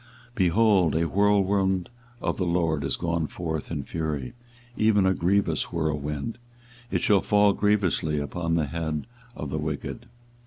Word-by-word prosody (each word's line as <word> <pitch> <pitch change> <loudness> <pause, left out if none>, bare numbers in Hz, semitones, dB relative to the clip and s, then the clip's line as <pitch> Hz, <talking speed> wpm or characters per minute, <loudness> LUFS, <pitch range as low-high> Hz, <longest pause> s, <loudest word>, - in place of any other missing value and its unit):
24:023:019 - - -30
Behold, 95 - +3
a 85 +1 +2
whirlwind 95 0 +2 0.3
of - - -1
the 95 - 0
LORD 85 -4 +1
is 70 - 0
gone 85 -2 -1
forth 80 -3 -4
in - - -3
fury, 75 -5 -3 0.4
even 110 -3 +3
a 95 - +4
grievous 95 +3 +1
whirlwind: 75 +5 -2 0.5
it - - 0
shall 100 -3 +4
fall 105 -1 +4
grievously 95 -7 +1
upon 85 +3 -2
the 80 -2 +1
head 80 0 -3 0.3
of 75 -3 -5
the 80 - -1
wicked. 75 -1 -4
85 Hz, 150 wpm, -26 LUFS, 80-100 Hz, 0.5 s, a